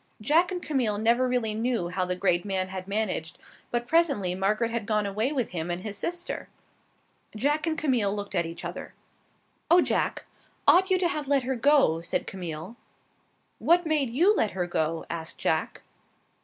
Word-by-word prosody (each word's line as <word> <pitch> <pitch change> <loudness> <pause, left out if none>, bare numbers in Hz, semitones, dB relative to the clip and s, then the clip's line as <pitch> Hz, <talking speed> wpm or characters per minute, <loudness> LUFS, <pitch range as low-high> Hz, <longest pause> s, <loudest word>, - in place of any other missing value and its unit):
Jack 315 - +3
and 360 -1 -4
Camille 245 -8 0
never 235 +4 +2
really 245 -4 0
knew 225 -5 -1
how 180 +1 -1
the 180 0 -2
great 180 -2 +1
man 190 -2 -2
had 185 0 -6
managed, 195 -6 -2 0.3
but 240 0 -1
presently 275 - +2
Margaret 210 +5 0
had 230 -2 -3
gone 210 -2 +1
away 215 +6 -1
with 255 -6 -2
him 170 -1 -3
and 175 +1 -3
his 210 -2 -4
sister. 350 - -4 0.9
Jack 295 +8 0
and 315 -1 0
Camille 250 -11 +1
looked 205 -1 -5
at 170 -3 0
each 165 - -8
other. - - -7 0.7
"Oh, 345 +2 +7
Jack, - - 0 0.4
ought 375 +2 +6
you 375 - +4
to 360 -1 +2
have 300 -4 -3
let 280 -2 +2
her 260 +1 -1
go?" 255 - +3
said 170 - -2
Camille. 175 +2 -6 0.8
"What 350 +1 +3
made 300 -5 +1
you 350 - +3
let 220 - 0
her 180 - 0
go?" 165 -1 -1
asked 165 -1 -5
Jack. - - -1
220 Hz, 180 wpm, -27 LUFS, 185-285 Hz, 0.9 s, Oh